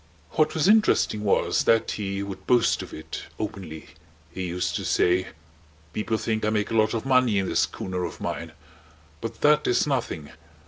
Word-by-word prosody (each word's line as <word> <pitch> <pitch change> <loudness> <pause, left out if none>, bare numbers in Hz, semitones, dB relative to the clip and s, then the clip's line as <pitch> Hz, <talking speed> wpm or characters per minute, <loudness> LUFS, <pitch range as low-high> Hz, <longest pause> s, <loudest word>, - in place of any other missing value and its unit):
What 155 - +1
was 160 +2 +2
interesting 210 - +3
was 100 - +2
that 115 -1 +3
he 100 -1 -3
would 95 -1 -8
boast 120 -2 +3
of - - -9
it 80 - -7
openly. 95 -7 -6 0.4
He 90 +1 -4
used 90 +1 -2
to - - -5
say: 90 +1 +2 0.7
"People 110 +1 -1
think 110 0 -2
I 105 - +2
make 105 0 -1
a - - -1
lot 110 0 +3
of 115 - -3
money 130 -5 +3
in 95 -1 0
this - - 0
schooner 90 -1 -2
of 85 - -5
mine. 80 -1 -4 0.7
But - - -6
that 150 0 +4
is 125 - +3
nothing. 115 - -2
105 Hz, 180 wpm, -25 LUFS, 95-120 Hz, 0.7 s, that